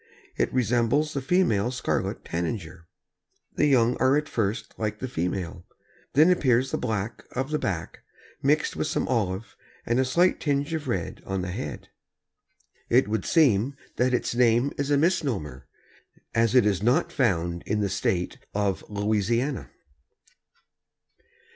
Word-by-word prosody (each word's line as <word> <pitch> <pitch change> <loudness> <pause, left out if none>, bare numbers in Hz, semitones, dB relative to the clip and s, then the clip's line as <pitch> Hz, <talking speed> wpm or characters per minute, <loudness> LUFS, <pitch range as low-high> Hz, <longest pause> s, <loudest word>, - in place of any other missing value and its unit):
It - - 0
resembles 125 +5 +1
the 140 - -2
female 125 - +2
Scarlet 125 -1 -2
Tanager. 85 -1 -4 0.7
The 150 - +2
young 125 -3 +4
are 130 +2 +3
at 150 0 -1
first 110 0 -2
like 105 -1 -2
the 130 - -4
female. 90 -4 -3 0.5
Then 155 +6 +6
appears 130 -6 +2
the - - 0
black 105 -2 -3
of 135 +3 -2
the 150 - 0
back, 85 -4 -3 0.4
mixed 150 +3 +2
with - - -1
some - - -1
olive 105 -4 -1 0.3
and 120 +2 +1
a - - +4
slight 175 +8 +2
tinge 145 +1 -1
of 155 -3 -3
red 95 -9 -3
on 95 -1 -3
the 90 - -4
head. 75 -5 -6 1.0
It 125 0 +4
would 110 -2 -1
seem 135 - +3 0.2
that 125 +1 +2
its 125 - 0
name 120 +2 +3
is 140 0 -2
a 145 - +4
misnomer, 125 - -1 0.7
as 115 +1 +2
it 125 -4 +6
is 100 -3 +1
not 120 +5 +2
found 85 -8 0
in 105 +1 0
the 100 - +1 0.2
State 90 -1 0 0.2
of 100 -2 0
Louisiana. 110 +6 0
115 Hz, 150 wpm, -26 LUFS, 100-135 Hz, 1.0 s, Then